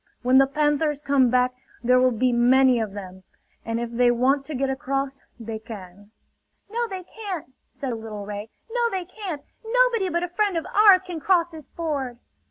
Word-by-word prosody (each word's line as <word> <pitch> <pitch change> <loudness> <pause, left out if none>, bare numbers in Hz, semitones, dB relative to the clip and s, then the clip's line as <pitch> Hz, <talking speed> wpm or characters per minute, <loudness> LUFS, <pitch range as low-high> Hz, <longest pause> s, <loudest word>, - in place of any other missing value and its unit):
When 255 +2 +5
the 270 - +5
panthers 295 +1 +1
come 275 -4 +3
back 250 +1 +2 0.3
there 250 +1 +5
will 255 0 +5
be 250 +1 +1
many 250 +1 +5
of 215 -3 -3
them; 190 -2 -8 0.4
and 230 0 -2
if 235 0 -4
they 245 +1 +3
want 260 +4 +2
to 310 - -5
get 270 +1 0
across 275 0 -3 0.2
they 225 -1 -5
can." 205 -2 -11 0.6
"No 475 +1 -1
they 380 -3 -6
can't," 370 - -7 0.2
said 270 -3 -5
a - - -3
little 215 -2 -7
ray. 205 +1 -6 0.2
"No 475 0 +1
they 375 -4 -3
can't! 365 -6 -6 0.2
Nobody 460 -4 +2
but 345 0 -1
a - - -1
friend 395 0 0
of 325 - -2
ours 405 -3 +7
can 350 -3 -5
cross 345 +1 +3
this 315 -3 -11
ford!" 280 -7 -3
270 Hz, 190 wpm, -24 LUFS, 240-350 Hz, 0.6 s, ours